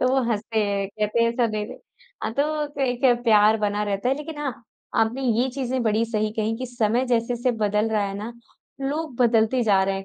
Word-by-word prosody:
तो 255 Hz, -, +3 dB
वो 265 Hz, 0 st, +2 dB
हँसते 220 Hz, +1 st, -1 dB
हैं, 200 Hz, -1 st, -1 dB
कहते 210 Hz, +3 st, 0 dB
हैं 230 Hz, -, +3 dB
ऐसा 235 Hz, 0 st, +1 dB
दे 215 Hz, -1 st, -2 dB
दे। -, -, -10 dB, 0.4 s
हाँ, -, -, -2 dB
तो 300 Hz, +3 st, 0 dB
क -, -, -1 dB
एक 245 Hz, -1 st, 0 dB
है 245 Hz, -, +6 dB
प्यार 215 Hz, -1 st, +5 dB
बना 210 Hz, 0 st, 0 dB
रहता 200 Hz, +3 st, -1 dB
है 265 Hz, -, +3 dB
लेकिन 300 Hz, 0 st, -7 dB
हाँ, 280 Hz, -5 st, -2 dB, 0.4 s
आपने 230 Hz, +4 st, +1 dB
ये 245 Hz, +1 st, +2 dB
चीज़ें 260 Hz, -1 st, -2 dB
बड़ी 220 Hz, 0 st, +2 dB
सही 215 Hz, -2 st, -1 dB
कहीं 220 Hz, +1 st, -1 dB
कि 255 Hz, -, -4 dB
समय 240 Hz, +1 st, 0 dB
जैसे-जैसे 240 Hz, +1 st, +1 dB
बदल 210 Hz, +1 st, +1 dB
रहा 215 Hz, -1 st, +1 dB
है 195 Hz, -, -5 dB
ना, 215 Hz, +3 st, -6 dB, 0.5 s
लोग 290 Hz, +1 st, -3 dB
बदलते 235 Hz, 0 st, +3 dB
जा 200 Hz, -3 st, +4 dB
रहे 195 Hz, 0 st, 0 dB
हैं। 195 Hz, 0 st, -5 dB
230 Hz, 225 wpm, -24 LUFS, 210-255 Hz, 0.5 s, है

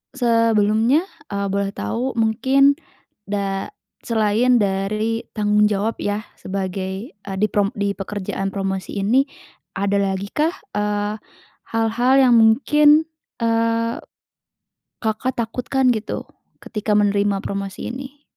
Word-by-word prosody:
sebelumnya, 230 Hz, +2 st, +3 dB, 0.2 s
eee, 200 Hz, 0 st, -2 dB
boleh 200 Hz, 0 st, -1 dB
tahu 255 Hz, +3 st, -2 dB
mungkin 265 Hz, +5 st, +3 dB, 0.5 s
da 195 Hz, -1 st, -2 dB, 0.3 s
selain 225 Hz, +2 st, +2 dB
dari 215 Hz, +2 st, 0 dB
tanggung 210 Hz, -1 st, +3 dB
jawab 210 Hz, +2 st, -1 dB
yah, 205 Hz, +1 st, -2 dB, 0.2 s
sebagai, 190 Hz, +3 st, -4 dB
eee, 200 Hz, -1 st, -8 dB
di 210 Hz, +2 st, +2 dB
prom 205 Hz, -1 st, +2 dB
di 200 Hz, -1 st, 0 dB
pekerjaan 195 Hz, -1 st, -4 dB
promosi 195 Hz, 0 st, -3 dB
ini, 260 Hz, +7 st, +3 dB, 0.5 s
ada 200 Hz, +1 st, +1 dB
lagi 195 Hz, 0 st, -2 dB
kah, 315 Hz, +4 st, 0 dB, 0.2 s
eee, 210 Hz, +1 st, -1 dB, 0.6 s
hal-hal 225 Hz, +3 st, +2 dB
yang 250 Hz, -, +5 dB
mungkin, 295 Hz, +7 st, +5 dB, 0.4 s
eee, 230 Hz, 0 st, +1 dB, 1.0 s
Kakak 230 Hz, +4 st, -1 dB
takutkan 250 Hz, +3 st, 0 dB
gitu? 220 Hz, -2 st, -3 dB, 0.4 s
Ketika 210 Hz, -1 st, -1 dB
menerima 205 Hz, -1 st, +2 dB
promosi 195 Hz, +1 st, -4 dB
ini? 275 Hz, +3 st, -9 dB
215 Hz, 110 wpm, -21 LUFS, 200-235 Hz, 1.0 s, yang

